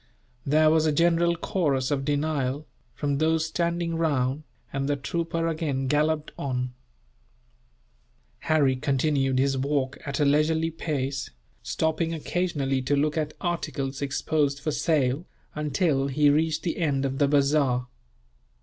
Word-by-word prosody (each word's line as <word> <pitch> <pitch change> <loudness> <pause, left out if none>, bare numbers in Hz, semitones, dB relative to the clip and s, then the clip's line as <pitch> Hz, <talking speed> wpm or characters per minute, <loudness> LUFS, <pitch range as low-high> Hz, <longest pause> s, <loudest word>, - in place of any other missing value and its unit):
There 155 +2 +5
was 160 0 +3
a - - +3
general 170 +2 +3
chorus 145 -7 0
of 135 -1 0
denial, 145 -1 -1 0.3
from 140 0 -1
those 160 0 +2
standing 170 +1 -1
round, 145 -4 0 0.3
and 135 +1 -1
the 145 - +2
trooper 165 +3 -2
again 155 -5 -1
galloped 150 +2 +1
on. 125 -2 -2 1.7
Harry 145 -5 +2
continued 135 -1 +1
his 135 0 +2
walk 140 -1 -1
at 140 +1 -3
a 145 - +3
leisurely 160 +3 +2
pace, 140 -5 -3 0.3
stopping 160 - -1
occasionally 145 -5 -1
to 135 +3 +1
look 150 +1 +1
at 155 -1 -2
articles 145 -6 -3
exposed 140 0 0
for 155 +2 -2
sale, 145 -1 0 0.3
until 150 -2 0
he 145 +1 +3
reached 155 +1 +1
the 170 - -2
end 140 -5 0
of 135 0 -2
the 145 - +4
bazaar. 140 -3 +2
145 Hz, 135 wpm, -26 LUFS, 135-160 Hz, 1.7 s, There